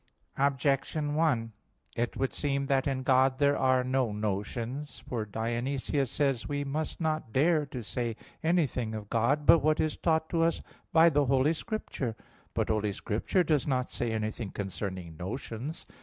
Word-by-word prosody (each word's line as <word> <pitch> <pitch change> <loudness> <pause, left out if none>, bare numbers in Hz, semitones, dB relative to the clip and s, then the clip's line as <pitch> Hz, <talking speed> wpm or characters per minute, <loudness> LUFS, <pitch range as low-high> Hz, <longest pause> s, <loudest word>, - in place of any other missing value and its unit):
Objection 140 +2 +1
1: 140 -8 +1 0.4
It 120 0 -1
would 135 - 0
seem 140 -1 0
that 135 0 +1
in 130 -1 -1
God 130 0 +4
there 145 0 +3
are 130 -1 +3
no 130 -2 +1
notions. 115 +7 -3
For 115 -4 -2
Dionysius 120 +5 -1
says 135 -2 +1
(Div. - - -8
Nom. 145 - -2
i): - - 0
"We 145 - -1
must 150 +3 -3
not 155 -7 -1
dare 150 +3 +3
to 125 -3 -6
say 115 +3 -2 0.3
anything 145 -10 +1
of 105 -1 -7
God 135 +6 +2
but 165 - +8
what 155 +1 +2
is 155 - 0
taught 160 -1 +1
to 165 - +2
us 165 0 +1 0.3
by 165 +1 +7
the 145 -1 +3
Holy 135 +4 +3
Scripture." 155 - -4 0.4
But - - 0
Holy 105 -2 +1
Scripture 115 - 0
does 155 -5 +1
not 130 -2 0
say 120 -1 -1
anything 110 0 -2
concerning 95 -4 -5
notions. 115 - -5
130 Hz, 170 wpm, -30 LUFS, 115-150 Hz, 0.4 s, but